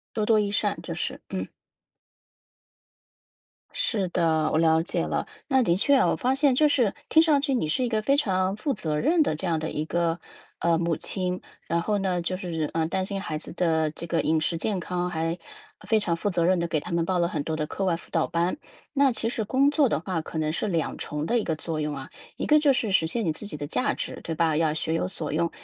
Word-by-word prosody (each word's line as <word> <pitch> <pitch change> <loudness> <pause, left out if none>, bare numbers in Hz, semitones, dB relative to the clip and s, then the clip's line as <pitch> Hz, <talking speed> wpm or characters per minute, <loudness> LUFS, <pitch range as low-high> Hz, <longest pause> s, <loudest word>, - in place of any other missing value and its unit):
多 215 -2 0
多 220 -1 +5
益 205 -1 +1
善， 205 - 0
就 - - -5
是， - - -3
嗯。 - - -3 2.2
是 200 -6 -1
的， 160 -2 +1
我 - - +3
了 160 0 +4
解 170 - -1
了。 - - -1 0.2
那 265 -3 +4
的 170 -7 +2
确 280 +9 +4
哦， - - +4
我 - - 0
发 255 +1 +1
现 275 -1 +3
就 300 +4 +4
是 245 -8 +2
听 320 - +6
上 305 -4 +4
去 275 -1 0
你 230 -11 0
是 250 +11 +1
一 - - 0
个 220 -2 0
非 275 +5 +3
常 190 -7 +1
负 275 +5 -1
责 155 -7 -2
任 325 - +3
的 275 - +1
这 185 - -4
样 165 -2 +1
的 160 - -3
一 150 - -2
个 170 +1 0 0.4
呃， 170 -1 +2
母 170 -1 0
亲。 180 -1 -2 0.3
然 170 +1 +1
后 210 +3 0
呢 185 -2 0
就 180 +2 -2
是 165 -5 -3
呃， 165 -1 +1
担 185 +3 -1
心 195 0 -3
孩 155 -6 -3
子 - - -8
的 160 -3 +1
这 165 +2 -6
个 170 0 0
饮 160 +1 +2
食 165 +2 0
健 200 +3 0
康， 180 0 -2
还 165 0 -2 0.5
非 220 - +4
常 185 -5 +2
负 185 - -1
责 175 -2 +1
任 185 +1 +3
地 170 - -1
给 155 -2 0
他 - - -8
们 170 -1 +1
报 185 0 +1
了 170 0 +2
很 150 - -2
多 160 +2 -3
的 155 -1 -2
课 195 - -3
外 175 -3 +2
辅 - - -15
导 165 - +1
班。 170 - 0 0.3
那 280 -2 +4
其 230 -1 -1
实 230 - -2
工 270 +6 +3
作 290 -2 +3
的 - - +1
话 175 -1 -2
可 160 - -8
能 155 -1 0
是 190 - -2
2 165 -5 -1
重 150 0 -4
的 235 +8 +2
一 220 - -1
个 160 - -1
作 160 0 -4
用 150 -1 -2
啊。 135 +1 -8 0.3
一 - - -3
个 300 0 +5
就 290 -2 +4
是 220 -5 -1
实 165 -4 +3
现 225 +7 -1
你 165 - +1
自 205 - -9
己 200 - -6
的 145 - -5
价 250 - 0
值， - - -5
对 165 - -3
吧？ 160 0 +2
要 155 -1 +2
学 160 0 -2
有 165 +2 0
所 155 -5 -4
用。 165 +2 +1
175 Hz, 270 characters per minute, -26 LUFS, 160-220 Hz, 2.2 s, 听